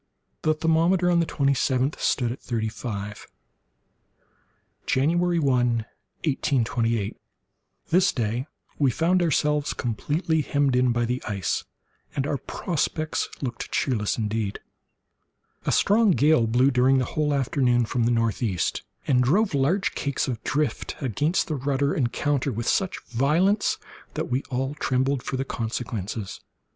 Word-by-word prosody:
The 155 Hz, 0 st, +2 dB
thermometer, 170 Hz, +3 st, +2 dB
on 170 Hz, -, +4 dB
the 165 Hz, -, +1 dB
twenty 140 Hz, -1 st, +1 dB
seventh 130 Hz, +1 st, 0 dB
stood 120 Hz, -3 st, +1 dB
at 125 Hz, -, -7 dB
thirty 110 Hz, -2 st, -2 dB
five. 105 Hz, -1 st, -6 dB, 1.6 s
January 170 Hz, +6 st, +2 dB
1, 125 Hz, -6 st, +2 dB, 0.4 s
1828.—This 125 Hz, -, -1 dB
day 120 Hz, +2 st, -2 dB, 0.3 s
we 140 Hz, -3 st, +4 dB
found 175 Hz, +8 st, +2 dB
ourselves 150 Hz, -2 st, +1 dB
completely 150 Hz, -, -1 dB
hemmed 140 Hz, -2 st, +1 dB
in 125 Hz, 0 st, +3 dB
by 120 Hz, 0 st, +1 dB
the 125 Hz, +2 st, -2 dB
ice, 100 Hz, -5 st, -1 dB, 0.5 s
and 135 Hz, -, 0 dB
our 140 Hz, -1 st, -1 dB
prospects 155 Hz, -2 st, -2 dB
looked 120 Hz, -4 st, -4 dB
cheerless 110 Hz, -7 st, 0 dB
indeed. 105 Hz, -2 st, -2 dB, 1.1 s
A -, -, +3 dB
strong 215 Hz, +2 st, +4 dB
gale 150 Hz, -8 st, +4 dB
blew, 125 Hz, +5 st, +3 dB
during 130 Hz, +1 st, +4 dB
the 130 Hz, -, +1 dB
whole 150 Hz, +3 st, -1 dB
forenoon, 125 Hz, -2 st, +2 dB
from 120 Hz, +1 st, 0 dB
the -, -, +3 dB
northeast, 115 Hz, -5 st, 0 dB, 0.2 s
and 125 Hz, -2 st, +3 dB
drove 190 Hz, -, +2 dB
large 150 Hz, +9 st, +1 dB
cakes 140 Hz, 0 st, -1 dB
of 120 Hz, -4 st, -3 dB
the -, -, -3 dB
drift 145 Hz, -5 st, -1 dB
against 145 Hz, -, 0 dB
the 155 Hz, -, -3 dB
rudder 140 Hz, 0 st, 0 dB
and 125 Hz, -5 st, 0 dB
counter 145 Hz, -2 st, 0 dB
with 115 Hz, +1 st, -4 dB
such 190 Hz, -2 st, +1 dB
violence 160 Hz, -, +2 dB, 0.4 s
that -, -, -3 dB
we 130 Hz, +2 st, +1 dB
all 135 Hz, +2 st, -1 dB
trembled 135 Hz, -1 st, 0 dB
for 130 Hz, -, -3 dB
the 135 Hz, -, -2 dB
consequences. 110 Hz, -5 st, -4 dB
135 Hz, 140 wpm, -25 LUFS, 120-150 Hz, 1.6 s, on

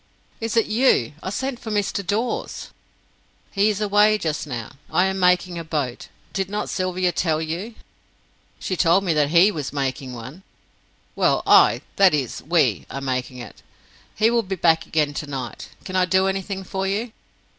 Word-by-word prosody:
"Is 225 Hz, 0 st, -2 dB
it 225 Hz, -, +4 dB
you? 215 Hz, -, +2 dB
I -, -, -4 dB
sent 265 Hz, +4 st, -3 dB
for 225 Hz, -, -7 dB
Mr. 205 Hz, -1 st, -1 dB
Dawes." 215 Hz, +6 st, -3 dB, 0.8 s
"He 200 Hz, +1 st, +2 dB
is 210 Hz, -1 st, -1 dB
away 210 Hz, +1 st, +4 dB
just 155 Hz, -5 st, -3 dB
now. 120 Hz, -5 st, -5 dB, 0.2 s
I 180 Hz, -, +3 dB
am 190 Hz, 0 st, -1 dB
making 180 Hz, -1 st, +2 dB
a -, -, -5 dB
boat. 145 Hz, -6 st, -3 dB, 0.3 s
Did 195 Hz, -1 st, -2 dB
not 210 Hz, +1 st, -3 dB
Sylvia 185 Hz, -1 st, 0 dB
tell 160 Hz, -2 st, 0 dB
you?" 170 Hz, +8 st, -4 dB, 0.8 s
"She 185 Hz, -, -3 dB
told 175 Hz, +2 st, +3 dB
me 175 Hz, -4 st, +1 dB
that 150 Hz, -2 st, +2 dB
he 175 Hz, +6 st, +5 dB
was 150 Hz, -8 st, -4 dB
making 135 Hz, -2 st, -3 dB
one." 130 Hz, +9 st, -9 dB, 0.7 s
"Well, -, -, +2 dB
I -, -, +6 dB, 0.2 s
that 190 Hz, -5 st, +6 dB
is, 135 Hz, -5 st, -3 dB
we 135 Hz, -, +1 dB
are 135 Hz, -, -5 dB
making 130 Hz, -1 st, -3 dB
it. 120 Hz, -, -10 dB, 0.5 s
He 225 Hz, +2 st, +3 dB
will 235 Hz, 0 st, +3 dB
be 190 Hz, -3 st, -4 dB
back 165 Hz, -2 st, +2 dB
again 150 Hz, -2 st, 0 dB
tonight. 135 Hz, -5 st, -6 dB, 0.2 s
Can 185 Hz, -, -6 dB
I 185 Hz, -1 st, +4 dB
do 190 Hz, +1 st, +2 dB
anything 195 Hz, 0 st, -2 dB
for 190 Hz, +1 st, -3 dB
you?" 215 Hz, +4 st, -2 dB
180 Hz, 175 wpm, -22 LUFS, 150-200 Hz, 0.8 s, I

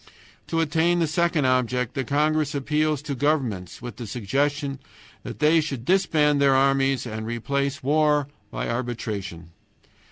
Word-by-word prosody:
To 165 Hz, -, 0 dB
attain 165 Hz, +2 st, +2 dB
the 170 Hz, -, +2 dB
second 160 Hz, -1 st, +1 dB
object 125 Hz, -1 st, +1 dB
the 135 Hz, -3 st, -2 dB
congress 150 Hz, +2 st, +1 dB
appeals 150 Hz, +1 st, 0 dB
to 150 Hz, -2 st, -3 dB
governments 125 Hz, -, -1 dB
with 120 Hz, -4 st, -7 dB
the 120 Hz, -2 st, -6 dB
suggestion 140 Hz, +6 st, -1 dB, 0.4 s
that -, -, -8 dB
they 155 Hz, +2 st, +4 dB
should 135 Hz, -6 st, -5 dB
disband 155 Hz, -6 st, +2 dB
their 135 Hz, -1 st, +5 dB
armies 135 Hz, -1 st, +2 dB
and 110 Hz, -2 st, -5 dB
replace 140 Hz, +5 st, -2 dB
war 150 Hz, 0 st, +2 dB, 0.2 s
by -, -, -4 dB
arbitration. 105 Hz, -8 st, -4 dB
140 Hz, 140 wpm, -24 LUFS, 120-150 Hz, 0.4 s, their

